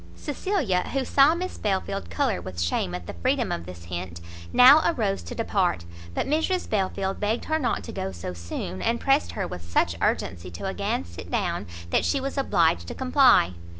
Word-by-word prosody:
Cecilia, 290 Hz, -, -1 dB
who 270 Hz, -1 st, 0 dB
saw 280 Hz, +5 st, +5 dB
Miss 370 Hz, +2 st, -5 dB
Belfield 195 Hz, -1 st, -2 dB
colour 270 Hz, -9 st, 0 dB
with 90 Hz, -2 st, -7 dB
shame 85 Hz, +1 st, 0 dB
at 90 Hz, -1 st, -7 dB
the -, -, -6 dB
freedom 85 Hz, -, 0 dB
of 85 Hz, 0 st, -4 dB
this 90 Hz, -2 st, -9 dB
hint, 85 Hz, 0 st, -6 dB, 0.3 s
now 275 Hz, +5 st, +8 dB
arose 215 Hz, -12 st, 0 dB
to -, -, -8 dB
depart; 190 Hz, -, 0 dB, 0.3 s
but -, -, 0 dB
Mrs 320 Hz, +6 st, 0 dB
Belfield 195 Hz, -1 st, -1 dB
begged 215 Hz, +3 st, -1 dB
her 315 Hz, 0 st, 0 dB
not 260 Hz, -, -1 dB
to -, -, -7 dB
go 95 Hz, -, -4 dB
so 90 Hz, 0 st, -6 dB
soon, 85 Hz, +2 st, -6 dB
and 235 Hz, 0 st, 0 dB
pressed 275 Hz, +2 st, +2 dB
her 195 Hz, -3 st, -2 dB
with 90 Hz, -, -7 dB
such 85 Hz, 0 st, 0 dB
urgency 90 Hz, 0 st, -1 dB
to 85 Hz, -, -7 dB
again 90 Hz, -, -2 dB
sit 85 Hz, 0 st, -10 dB
down, -, -, -1 dB, 0.2 s
that -, -, +3 dB
she 280 Hz, -, +1 dB
was 275 Hz, +1 st, -4 dB
obliged 165 Hz, -, +2 dB
to -, -, -6 dB
comply. 255 Hz, -, +4 dB
195 Hz, 190 wpm, -25 LUFS, -, 0.3 s, now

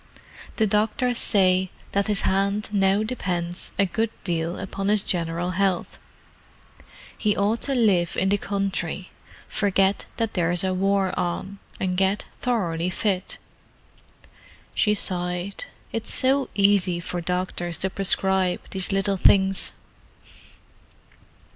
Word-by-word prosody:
The 220 Hz, -, +2 dB
doctors 220 Hz, +4 st, +1 dB
say 185 Hz, -2 st, +3 dB, 0.2 s
that 200 Hz, +1 st, 0 dB
his 210 Hz, -2 st, +2 dB
hand 200 Hz, +2 st, 0 dB
now 195 Hz, 0 st, +2 dB
depends 180 Hz, -7 st, -3 dB
a 200 Hz, -, +4 dB
good 215 Hz, +5 st, -1 dB
deal 170 Hz, -1 st, -2 dB
upon 195 Hz, +1 st, -4 dB
his 210 Hz, -1 st, +4 dB
general 170 Hz, 0 st, -1 dB
health: 185 Hz, -1 st, -1 dB, 1.2 s
he 210 Hz, -2 st, 0 dB
ought 210 Hz, +3 st, +1 dB
to 275 Hz, -, 0 dB
live 195 Hz, -8 st, +2 dB
in 190 Hz, -, +2 dB
the 205 Hz, +1 st, +2 dB
country, 195 Hz, -2 st, -3 dB, 0.4 s
forget 195 Hz, -1 st, +1 dB
that 225 Hz, -2 st, -1 dB
there's 175 Hz, 0 st, 0 dB
a 190 Hz, -1 st, 0 dB
war 195 Hz, 0 st, +1 dB
on, 185 Hz, +3 st, -3 dB, 0.2 s
and 185 Hz, -1 st, -1 dB
get 195 Hz, +2 st, +1 dB
thoroughly 180 Hz, -9 st, -1 dB
fit." 190 Hz, 0 st, -2 dB, 1.4 s
She 210 Hz, -1 st, +2 dB
sighed. 180 Hz, 0 st, 0 dB, 0.3 s
"It's 225 Hz, -1 st, -2 dB
so 270 Hz, +1 st, +2 dB
easy 195 Hz, -3 st, +3 dB
for 175 Hz, 0 st, -4 dB
doctors 175 Hz, -1 st, -2 dB
to 190 Hz, +2 st, -1 dB
prescribe 190 Hz, -1 st, +2 dB
these 190 Hz, 0 st, -2 dB
little 195 Hz, 0 st, +1 dB
things." 190 Hz, +1 st, +3 dB
195 Hz, 120 wpm, -24 LUFS, 180-205 Hz, 1.4 s, a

